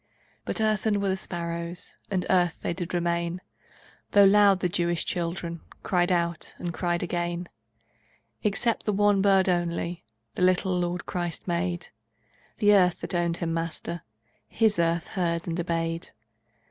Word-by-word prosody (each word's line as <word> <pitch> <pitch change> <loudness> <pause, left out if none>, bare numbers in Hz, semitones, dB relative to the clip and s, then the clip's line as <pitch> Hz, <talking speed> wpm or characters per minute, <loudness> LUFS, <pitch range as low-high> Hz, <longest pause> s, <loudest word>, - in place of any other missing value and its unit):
But - - 0
earthen 215 -1 +1
were 200 -1 0
the 190 - +1
sparrows, 170 -1 -4
And 190 -3 -1
earth 175 -2 +2
they - - -1
did 175 0 -5
remain, 170 0 -1 0.7
Though 205 - +8
loud 200 -1 +6
the 180 - +2
Jewish 175 -2 0
children 170 -1 -3 0.2
Cried 175 -1 +1
out, 170 -2 -1
and 175 -1 -4
cried 175 0 -1
again. 175 0 -2 0.9
Except 220 +3 0
the 210 - +2
one 205 0 +3
bird 195 -1 +4
only 175 -2 -1 0.3
The - - -5
little 185 0 +3
Lord 175 0 -2
Christ 175 -1 -3
made; 175 0 -2 0.7
The 210 -2 +5
earth 180 -4 +4
that - - 0
owned 170 -1 0
Him 165 -1 -2
Master, 165 +1 -3 0.5
His 220 -4 +2
earth 170 0 +1
heard 170 -3 -1
and 170 +1 -2
obeyed. 165 -1 -2
175 Hz, 145 wpm, -27 LUFS, 170-190 Hz, 0.9 s, Though